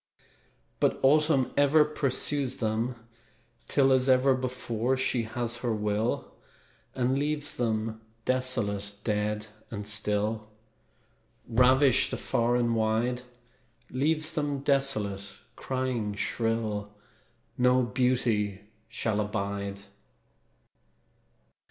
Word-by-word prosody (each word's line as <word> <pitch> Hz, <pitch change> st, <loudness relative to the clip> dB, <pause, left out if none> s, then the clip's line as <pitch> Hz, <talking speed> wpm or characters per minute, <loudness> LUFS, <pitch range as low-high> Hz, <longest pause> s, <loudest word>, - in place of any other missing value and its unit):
But -, -, +1 dB
Autumn 150 Hz, -1 st, +3 dB
ever 145 Hz, +2 st, +5 dB
Pursues 140 Hz, -2 st, +1 dB
them 115 Hz, +2 st, -1 dB, 0.7 s
till, 135 Hz, -2 st, +3 dB
As 130 Hz, 0 st, +2 dB
ever 130 Hz, +1 st, +5 dB
before, 130 Hz, -1 st, -2 dB
She 130 Hz, -2 st, 0 dB
has 120 Hz, +1 st, -2 dB
her 120 Hz, -2 st, -1 dB
will, 105 Hz, +2 st, -1 dB, 0.6 s
And 130 Hz, +1 st, +1 dB
leaves 150 Hz, 0 st, -1 dB
them 110 Hz, -1 st, -2 dB, 0.2 s
desolate, 110 Hz, -6 st, 0 dB
dead 105 Hz, 0 st, -1 dB, 0.2 s
and 105 Hz, -2 st, -6 dB
still, 105 Hz, +1 st, 0 dB, 1.0 s
Ravished 130 Hz, +3 st, +4 dB
afar 120 Hz, +1 st, 0 dB
and 120 Hz, -1 st, +1 dB
wide; 115 Hz, +3 st, 0 dB, 0.7 s
Leaves 155 Hz, +4 st, 0 dB
them 145 Hz, -3 st, -2 dB
desolate; 110 Hz, -9 st, 0 dB, 0.2 s
crying 130 Hz, -6 st, -2 dB
shrill, 110 Hz, -2 st, -2 dB, 0.6 s
"No 125 Hz, 0 st, +3 dB
beauty 120 Hz, -5 st, 0 dB, 0.3 s
shall 110 Hz, -2 st, -1 dB
abide!" 100 Hz, -1 st, -3 dB
120 Hz, 90 wpm, -28 LUFS, 105-130 Hz, 1.0 s, ever